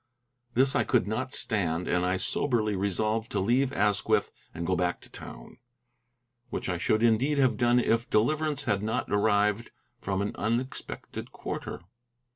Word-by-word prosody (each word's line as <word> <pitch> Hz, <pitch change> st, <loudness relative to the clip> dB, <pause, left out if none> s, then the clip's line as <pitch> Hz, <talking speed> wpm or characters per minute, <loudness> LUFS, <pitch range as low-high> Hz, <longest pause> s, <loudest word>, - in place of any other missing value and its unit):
This 135 Hz, +2 st, +3 dB
I -, -, +3 dB
could 125 Hz, -5 st, +2 dB
not 110 Hz, +4 st, -2 dB
stand, 90 Hz, -, -1 dB
and 90 Hz, 0 st, +1 dB
I 90 Hz, +1 st, +1 dB
soberly 110 Hz, 0 st, 0 dB
resolved 110 Hz, +4 st, -1 dB
to -, -, +1 dB
leave 125 Hz, +7 st, +2 dB
Asquith 105 Hz, -3 st, +1 dB, 0.2 s
and 85 Hz, 0 st, -5 dB
go 90 Hz, +2 st, +1 dB
back 90 Hz, 0 st, 0 dB
to -, -, -13 dB
town, -, -, -10 dB, 0.9 s
which -, -, -3 dB
I 90 Hz, -2 st, -1 dB
should 110 Hz, +5 st, +1 dB
indeed 120 Hz, +6 st, +3 dB
have 130 Hz, -3 st, +3 dB
done 120 Hz, -1 st, +3 dB
if 115 Hz, -1 st, +1 dB
deliverance 150 Hz, +6 st, +1 dB
had 105 Hz, -7 st, 0 dB
not 110 Hz, +1 st, -2 dB
arrived 105 Hz, +2 st, +2 dB, 0.3 s
from 100 Hz, -2 st, -1 dB
an 100 Hz, -, -2 dB
unexpected 120 Hz, +4 st, -3 dB
quarter. -, -, -5 dB
110 Hz, 155 wpm, -28 LUFS, 100-120 Hz, 0.9 s, This